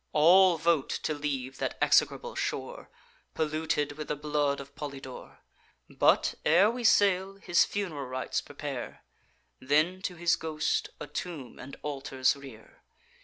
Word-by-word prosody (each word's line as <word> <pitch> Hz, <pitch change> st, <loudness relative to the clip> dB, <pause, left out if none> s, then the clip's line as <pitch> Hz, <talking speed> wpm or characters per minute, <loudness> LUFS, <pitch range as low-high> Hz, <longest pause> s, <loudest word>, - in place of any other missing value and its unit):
All 175 Hz, +3 st, +6 dB
vote 165 Hz, -3 st, +1 dB
to 155 Hz, -, 0 dB
leave 135 Hz, -3 st, -4 dB
that -, -, -2 dB
execrable 480 Hz, 0 st, +2 dB
shore, -, -, -4 dB, 0.5 s
Polluted 155 Hz, -1 st, -1 dB
with 150 Hz, +1 st, -7 dB
the -, -, -1 dB
blood 145 Hz, -1 st, 0 dB
of 140 Hz, 0 st, -10 dB
Polydore; 140 Hz, -3 st, -8 dB, 0.5 s
But, -, -, +3 dB
ere 180 Hz, +8 st, +5 dB
we 245 Hz, +1 st, -5 dB
sail, 195 Hz, -3 st, +3 dB
his 175 Hz, -3 st, +3 dB
fun'ral 160 Hz, -10 st, -4 dB
rites 130 Hz, -1 st, -2 dB
prepare, -, -, -7 dB, 0.6 s
Then, 155 Hz, +7 st, +1 dB
to 185 Hz, -2 st, -4 dB
his 170 Hz, -1 st, +2 dB
ghost, 155 Hz, -1 st, -1 dB
a -, -, -5 dB
tomb 145 Hz, -2 st, -7 dB
and 140 Hz, +2 st, -9 dB
altars 135 Hz, -2 st, 0 dB
rear. 135 Hz, -6 st, -14 dB
150 Hz, 135 wpm, -29 LUFS, 140-175 Hz, 0.6 s, All